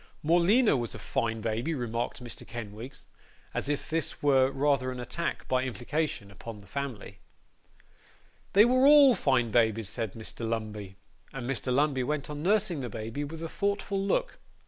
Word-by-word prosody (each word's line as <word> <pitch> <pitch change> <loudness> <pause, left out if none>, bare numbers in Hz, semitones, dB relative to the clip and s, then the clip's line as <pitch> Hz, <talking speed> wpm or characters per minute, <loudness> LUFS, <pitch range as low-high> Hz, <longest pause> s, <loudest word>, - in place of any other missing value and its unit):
'Morleena 175 - +4
was 120 -3 -3
a - - -6
fine 115 -1 -2
baby,' 115 +8 -1
remarked 120 -1 -3
Mr. 120 - -8
Kenwigs; 115 +3 -8 0.5
as - - -2
if 145 - -2
this 160 -2 -2
were 135 -2 +5
rather 135 -2 +1
an 125 - -6
attack, 170 +7 -3
by 130 0 +2
implication, 130 -3 -3
upon 110 +3 -9
the 100 - -14
family. 115 -4 -6 1.3
'They 205 +3 +8
were 255 +2 +5
all 290 -3 +8
fine 130 - +1
babies,' 110 -2 +2
said 110 -4 -3
Mr. 110 -1 -7
Lumbey. 105 -4 -4 0.4
And 125 -3 -5
Mr. 130 -1 -2
Lumbey 140 0 +2
went 150 +2 -2
on 145 0 -5
nursing 190 -2 +2
the 125 -3 -4
baby 115 +7 -4
with 160 +3 -6
a - - -2
thoughtful 200 +1 -1
look. - - 0
130 Hz, 165 wpm, -29 LUFS, 115-160 Hz, 1.3 s, They